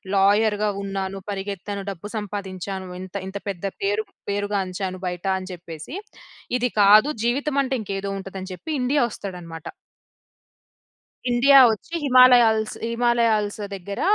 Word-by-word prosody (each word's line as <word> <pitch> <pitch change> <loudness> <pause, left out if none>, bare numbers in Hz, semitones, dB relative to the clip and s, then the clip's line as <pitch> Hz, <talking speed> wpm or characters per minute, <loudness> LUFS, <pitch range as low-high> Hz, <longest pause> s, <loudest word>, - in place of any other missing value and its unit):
లాయర్‌గా 205 +2 +3
ఉన్నాను. 195 0 -3
పరిగెత్తాను. 200 0 -5
డబ్బు 195 +3 -8
సంపాదించాను. 195 -2 -5
ఇంత 185 +1 -10
ఇంత 195 +1 -5
పెద్ద 195 0 -5 0.2
పేరు 205 +2 0 0.2
పేరుగాంచాను 195 -2 -2
బయట. 180 +1 -5
అని 185 0 -7
చెప్పేసి, 170 - -9 0.7
ఇది 245 0 +1
కాదు. 215 +8 +7 0.2
జీవితమంటే 275 +1 +1
ఇంకేదో 195 -1 -4
ఉంటదని 190 0 -7
చెప్పి 250 - -7
ఇండియా 270 +3 +2
వస్తాడనమాట. 175 -6 -8 1.6
ఇండియా 270 +3 +7
వచ్చి 220 +10 -6
హిమాలయాల్స్ 245 -5 +6 0.2
హిమాలయాల్స్ 230 -3 +1 0.2
దగ్గర, 200 +2 -6
200 Hz, 110 wpm, -23 LUFS, 190-230 Hz, 1.6 s, కాదు